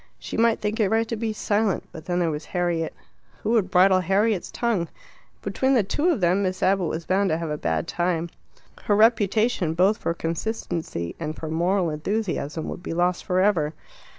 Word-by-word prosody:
She - - -7
might 230 0 +3
think 210 +2 -2
it 210 -3 +3
right 225 +1 +2
to 230 - -1
be 220 0 -2
silent, 210 -1 0
but 155 -1 -10
then 175 -1 -1
there 170 -2 +1
was 150 0 -5
Harriet. 175 -3 -1 0.5
Who 215 - 0
would 225 -5 +2
bridle 185 +1 +5
Harriet's 195 +2 +1
tongue? 220 -8 -1 0.6
Between 265 0 +1
the 230 - +4
two 295 - 0
of 295 - +1
them 180 +3 +3
Miss 185 -1 -1
Abbott 190 -2 +2
was 160 +1 -4
bound 195 +1 +2
to 160 - +1
have 165 -2 -4
a - - 0
bad 80 -1 -1
time. 170 -1 -1 0.5
Her 205 - +3
reputation, 215 -5 +3
both 190 +5 +3
for 170 - -1
consistency 165 - -3
and 155 -1 -4
for 160 - -6
moral 175 +2 +1
enthusiasm, 160 -2 -2
would - - -6
be 165 - -5
lost 175 +1 +1
for 185 0 +2
ever. 165 -7 +2
185 Hz, 195 wpm, -24 LUFS, 165-215 Hz, 0.6 s, bridle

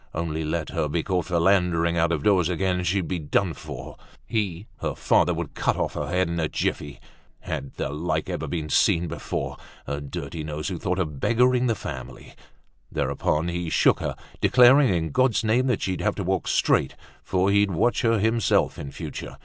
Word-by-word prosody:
Only 80 -1 -2
let 80 +1 -2
her 80 -3 -1
be 80 +2 -1
caught 90 -2 -1
philandering 85 -1 +2
out 85 0 +2
of 75 -4 -1
doors 95 -5 +3
again, 90 0 0
she'd 90 0 0
be 90 - -2
done 80 +4 0
for; - - -9 0.3
he, 100 -5 -2
her - - -3
father, - - +3
would - - -4
cut - - 0
off - - -1
her - - -3
head 90 0 +1
in 85 0 -2
a 80 - +1
jiffy. 75 -1 -3 0.4
Had 70 0 -5
the - - -3
like 80 +5 -2
ever - - -3
been 80 -3 -3
seen 85 +2 +3
before! - - -4 0.3
A 70 +1 -4
dirty 75 +3 -6
nose 75 -1 -4
who - - -4
thought 90 - -1
of 75 -7 -3
beggaring 125 - +3
her 115 - +1
family! 65 -8 -8 0.6
Thereupon 80 +3 0
he 85 -1 -3
shook - - +3
her, - - -3 0.3
declaring 130 +1 +6
in 80 -3 -1
God's 130 - +2
name 120 +4 +2
that 125 -5 0
she'd 95 -1 -2
have 105 - 0
to 100 - -3
walk 95 0 -1
straight, - - +2 0.3
for 95 +1 +1
he'd 100 0 +3
watch 110 +7 +1
her 115 -1 +3
himself 110 +2 +1
in 70 - -6
future. - - -7
90 Hz, 190 wpm, -25 LUFS, 80-100 Hz, 0.6 s, declaring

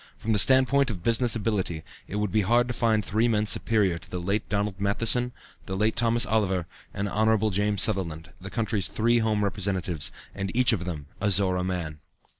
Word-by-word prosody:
From 110 - -2
the 105 - +2
standpoint 130 +3 +5
of 90 -6 -6
business 115 0 +3
ability, 100 -7 -2 0.2
it - - -7
would 105 -2 -1
be 110 +2 +2
hard 120 +5 +2
to 125 - -3
find 110 -4 +1
three 110 +4 +1
men 110 -2 +1
superior 105 -5 +1
to 90 +2 -17
the 90 - -5
late 100 +5 -2
Donald 100 -1 -2
Matheson, 115 +5 +2 0.4
the 95 - -4
late 110 +2 +1
Thomas 115 0 +2
Oliver, 95 -5 0 0.3
and 100 0 -3
Hon. 110 +1 +1
James 100 0 +1
Sutherland, 85 -7 0
the 95 - -8
county's 110 -3 -1
three 120 +2 +1
home 110 -2 0
representatives, 95 -5 -2 0.2
and 100 -1 -4
each 125 -1 +4
of 90 -5 -2
them 80 -6 -5 0.2
a 100 - +1
Zorra 95 -2 +2
man. 85 -5 -4
105 Hz, 195 wpm, -26 LUFS, 95-110 Hz, 0.4 s, standpoint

